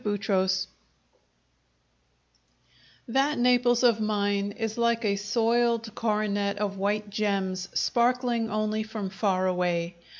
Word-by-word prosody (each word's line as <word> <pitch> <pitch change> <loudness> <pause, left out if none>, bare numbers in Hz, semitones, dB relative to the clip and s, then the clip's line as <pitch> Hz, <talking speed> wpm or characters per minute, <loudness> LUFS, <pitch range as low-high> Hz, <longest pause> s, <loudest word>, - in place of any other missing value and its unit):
Chapter 200 -2 0
Seven - - -2 2.6
That 275 +4 +1
Naples 245 0 +3
of 235 -3 +4
mine 205 -1 0
is 225 -1 -3
like 235 -1 +1
a 200 -1 +2
soiled 230 +2 0
coronet 205 -2 -1
of 200 -1 -2
white 205 +1 -1
gems, 195 -2 -1
sparkling 240 -1 +1
only 215 0 -1
from 215 -3 -5
far 190 -1 0
away. 175 -1 -1
210 Hz, 110 wpm, -27 LUFS, 200-230 Hz, 2.6 s, of